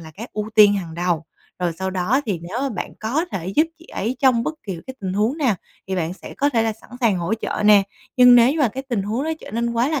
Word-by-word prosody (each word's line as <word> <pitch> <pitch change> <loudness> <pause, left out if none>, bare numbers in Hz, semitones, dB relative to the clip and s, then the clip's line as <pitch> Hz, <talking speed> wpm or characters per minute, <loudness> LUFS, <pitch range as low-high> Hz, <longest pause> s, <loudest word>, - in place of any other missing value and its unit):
là 160 -1 -11
cái 225 +10 -9
ưu 210 0 -4
tiên 205 -2 +7
hàng 170 -5 -4
đầu, 170 -2 -1 0.3
rồi 175 -2 0
sau 190 0 -2
đó 190 +9 +1
thì 190 -5 -1
nếu 185 +8 -5
mà 275 - 0
bạn 215 - -5
có 260 +10 0
thể 175 -1 -4
giúp 310 +2 +5
chị 335 - -17
ấy 235 +6 -3
trong 255 -4 +4
bất 315 - -2
kỳ 190 -5 -5
cái 260 - -7
tình 185 -1 -3
huống 215 +8 +1
nào 255 -9 +2 0.3
thì 190 0 -2
bạn 170 -1 -1
sẽ - - -11
có 285 - +1
thể 230 -3 +2
là 225 - 0
sẵn 220 - -19
sàng 220 -6 +3
hỗ 175 +6 -1
trợ 215 -1 -3
nè. 210 -1 +7 0.3
Nhưng 250 -1 +8
nếu 245 +3 +6
mà 285 -6 +4
cái 265 +5 -6
tình 240 -7 -2
huống 225 +7 -2
đó 320 - -1
trở - - -10
nên 235 +1 -1
quá 235 +4 +1
là 310 -4 0
220 Hz, 280 wpm, -21 LUFS, 190-250 Hz, 0.3 s, Nhưng